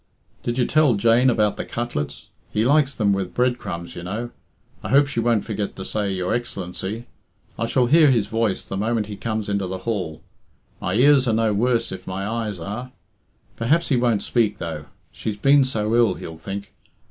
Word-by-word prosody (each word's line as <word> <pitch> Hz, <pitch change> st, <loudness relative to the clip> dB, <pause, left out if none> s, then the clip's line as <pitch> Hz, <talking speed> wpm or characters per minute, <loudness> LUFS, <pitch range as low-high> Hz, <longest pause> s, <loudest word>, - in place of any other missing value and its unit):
"Did 120 Hz, +1 st, -2 dB
you 125 Hz, -, +3 dB
tell 150 Hz, -5 st, +4 dB
Jane 115 Hz, +5 st, +4 dB
about 105 Hz, -4 st, +2 dB
the -, -, -3 dB
cutlets? 115 Hz, -12 st, -4 dB, 0.2 s
He 110 Hz, +2 st, 0 dB
likes 140 Hz, 0 st, +3 dB
them 100 Hz, -3 st, +2 dB
with 95 Hz, -2 st, -3 dB
bread 125 Hz, 0 st, +2 dB
crumbs, 85 Hz, -6 st, -6 dB
you -, -, -6 dB
know. 110 Hz, +7 st, -4 dB, 0.5 s
I -, -, -6 dB
hope 140 Hz, +2 st, +5 dB
she 140 Hz, -4 st, -3 dB
won't 115 Hz, -2 st, +1 dB
forget 105 Hz, -2 st, -3 dB
to 95 Hz, -, -6 dB
say 105 Hz, -2 st, -1 dB
'Your 90 Hz, -1 st, -1 dB
Excellency.' 110 Hz, -1 st, -4 dB, 0.5 s
I 115 Hz, -, 0 dB
shall 125 Hz, +1 st, +2 dB
hear 155 Hz, +3 st, +6 dB
his 115 Hz, -6 st, +3 dB
voice 110 Hz, -3 st, -1 dB
the 95 Hz, -, -5 dB
moment 110 Hz, +1 st, 0 dB
he 105 Hz, 0 st, -7 dB
comes 110 Hz, -1 st, -3 dB
into 100 Hz, -2 st, -1 dB
the 95 Hz, +1 st, -4 dB
hall. 95 Hz, -9 st, -3 dB, 0.6 s
My -, -, -2 dB
ears 135 Hz, +2 st, +5 dB
are 115 Hz, -, +2 dB
no 110 Hz, -1 st, +2 dB
worse, 115 Hz, +2 st, +1 dB
if 95 Hz, -1 st, -8 dB
my 95 Hz, +1 st, -3 dB
eyes 110 Hz, -3 st, -2 dB
are. 110 Hz, +9 st, -6 dB, 0.7 s
Perhaps 150 Hz, +9 st, +2 dB
he 140 Hz, -, +3 dB
won't 120 Hz, -4 st, +2 dB
speak, 110 Hz, -4 st, +1 dB
though, 80 Hz, -4 st, -5 dB, 0.3 s
'She's 105 Hz, -2 st, -4 dB
been 140 Hz, +5 st, +5 dB
so 110 Hz, -4 st, -1 dB
ill,' 115 Hz, -6 st, +4 dB
he'll 80 Hz, -, -8 dB
think. 100 Hz, +5 st, -7 dB
110 Hz, 195 wpm, -23 LUFS, 100-120 Hz, 0.7 s, hear